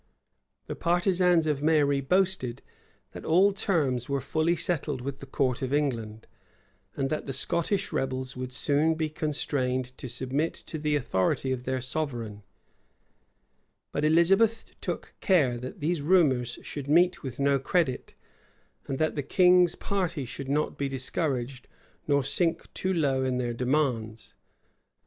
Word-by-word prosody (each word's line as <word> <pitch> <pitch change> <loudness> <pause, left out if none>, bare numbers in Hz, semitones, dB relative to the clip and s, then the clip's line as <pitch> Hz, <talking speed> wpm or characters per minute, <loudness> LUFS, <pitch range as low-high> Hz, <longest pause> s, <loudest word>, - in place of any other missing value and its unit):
The - - -5
partisans 175 -1 +2
of 150 -3 0
Mary 145 -3 +3
boasted, 155 -6 0 0.5
that - - -9
all 185 +5 +4
terms 145 - 0
were 140 0 0
fully 160 +5 0
settled 150 -5 -1
with 135 +1 -5
the 140 - -10
court 130 -2 0
of 130 -1 -2
England, 115 -7 -1 0.7
and 135 +1 -1
that 155 - -2
the 135 - -3
Scottish 170 +8 -1
rebels 130 -1 -2
would 125 0 -5
soon 145 +5 +1
be 160 -1 -1
constrained 130 -5 -2
to 130 - -6
submit 130 +6 -2
to 160 - -7
the 150 0 0
authority 130 0 0
of 125 -1 -3
their 130 0 -1
sovereign; 120 -7 -4 1.5
but 145 - -2
Elizabeth 195 +8 +4 0.2
took - - -4
care 150 -11 +3
that 125 +3 -8
these 160 +1 0
rumors 140 -8 +3
should 145 -2 -6
meet 175 +4 +4
with 130 -3 -7
no 140 0 +3
credit, 135 -1 -1 0.7
and 135 - -2
that 155 +1 +1
the 145 - -2
king's 180 +3 +4
party 180 -8 -2
should 130 +3 -7
not 150 +2 -1
be 140 -1 -1
discouraged, 130 -1 -3 0.4
nor 140 -2 +3
sink 165 +4 0
too 190 - -1
low 140 -7 +1
in 130 -1 0
their 120 -1 -1
demands. 125 -4 -1
140 Hz, 145 wpm, -27 LUFS, 130-165 Hz, 1.5 s, all